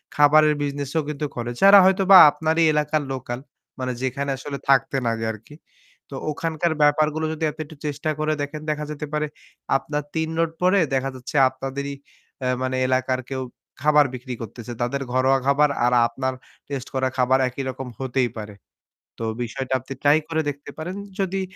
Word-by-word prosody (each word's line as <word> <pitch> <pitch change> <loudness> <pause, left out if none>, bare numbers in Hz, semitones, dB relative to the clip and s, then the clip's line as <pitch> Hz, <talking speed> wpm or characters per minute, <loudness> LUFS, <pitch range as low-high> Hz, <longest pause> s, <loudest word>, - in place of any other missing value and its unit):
খাবারের 150 +1 +6
বিজনেসও 145 +2 -2
কিন্তু 150 0 -3
করে। 120 0 -3
যারা 195 +1 +9
হয়তোবা 190 0 +6
আপনারই 160 +2 +1
এলাকার 150 0 +1
লোকাল, 125 -1 -5 0.4
মানে 130 0 -2
যেখানে 140 +2 -2
আসলে 140 +1 -6
থাকতেন 135 -1 +3
আগে 115 0 -3
আরকি। 110 +7 -13 0.5
তো 135 - -7 0.2
ওখানকার 165 +2 -1
ব্যাপারগুলো 155 +1 +3
যদি 160 0 -5
এত - - -20
একটু 155 0 -14
চেষ্টা 150 +1 -2
করে 155 0 +1
দেখেন। 145 +2 -4
দেখা 150 0 -2
যেতে 150 0 -5
পারে 150 0 0 0.5
আপনার 150 +1 -4
৩ 160 0 0
রোড 165 -1 +1
পরে 185 +2 +4
দেখা 135 0 0
যাচ্ছে 130 +4 -9
আপনাদেরই 135 +2 -5 0.5
এ - - +1
মানে 130 0 -1
এলাকার 130 0 +1
কেউ 130 -1 -3 0.4
খাবার 150 0 +5
বিক্রি 125 0 -6
করতেছে। 115 +2 -8
তাদের 135 +3 -1
ঘরোয়া 130 +1 +3
খাবার 145 +2 +4 0.2
আর 125 - +2
আপনার 130 +2 -3 0.4
টেস্ট 135 -2 -4
করা 130 0 +1
খাবার 130 +1 +3
একই 130 +2 -5
রকম 130 0 -6
হতেই 130 -2 0
পারে। 105 -1 -7 0.6
তো 115 - -6 0.2
বিষয়টা 130 +2 -4
আপনি 130 +2 -8
ট্রাই 145 +1 +6
করে 160 -1 0
দেখতে 145 0 -8
পারেন। 175 +4 -5 0.2
যদি 195 0 -1
140 Hz, 170 wpm, -23 LUFS, 130-155 Hz, 0.6 s, যারা